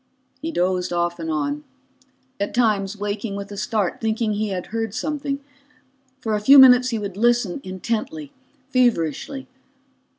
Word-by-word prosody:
He 325 +2 -3
dozed 180 - 0
off 175 0 -1
and 165 -1 -4
on, 150 -1 -2 0.8
at 200 - -2
times 210 -4 +1
waking 205 0 -3
with 200 0 -6
a - - -6
start, 210 -2 -1
thinking 220 -1 0
he 215 +1 -1
had 185 -2 -3
heard 225 -2 -2
something. 280 +1 -2 0.8
For 220 -3 -2
a 210 - 0
few 275 +6 +8
minutes 250 -1 +8
he 230 - -1
would 200 -3 -5
listen 240 0 +2
intently, 235 - -4 0.4
feverishly. 245 - 0
215 Hz, 145 wpm, -22 LUFS, 190-250 Hz, 0.8 s, few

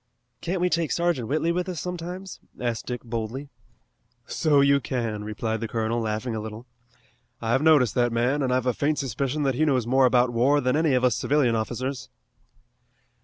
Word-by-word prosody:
"Can't 175 +1 -2
we 180 - +3
take 170 -3 0
Sergeant 170 -9 0
Whitley 155 +5 +1
with 180 +2 -2
us 175 -4 -4
sometimes?" 180 +2 -6 0.2
asked 120 -2 -3
Dick 125 -1 -4
boldly. 115 +4 -5 0.8
"So 150 -3 +2
you 140 0 +5
can," 115 -6 -3
replied 110 +1 -3
the 115 - -2
colonel, 115 +1 -1
laughing 110 +2 -2
a - - -2
little. 110 +2 -7 0.7
"I've 120 +4 +1
noticed 150 -9 +4
that 120 -1 +2
man, 125 +5 +1
and 130 -2 0
I've 130 0 +1
a 125 - +2
faint 150 +4 0
suspicion 135 +3 -2
that 135 -1 +1
he 145 +6 0
knows 130 -6 +2
more 130 +2 +4
about 125 -1 +2
war 135 +5 +3
than 125 -1 +1
any 155 -3 +2
of 125 - +1
us 125 -3 +3
civilian 135 -5 +2
officers." 125 +3 -3
130 Hz, 185 wpm, -25 LUFS, 115-150 Hz, 0.8 s, you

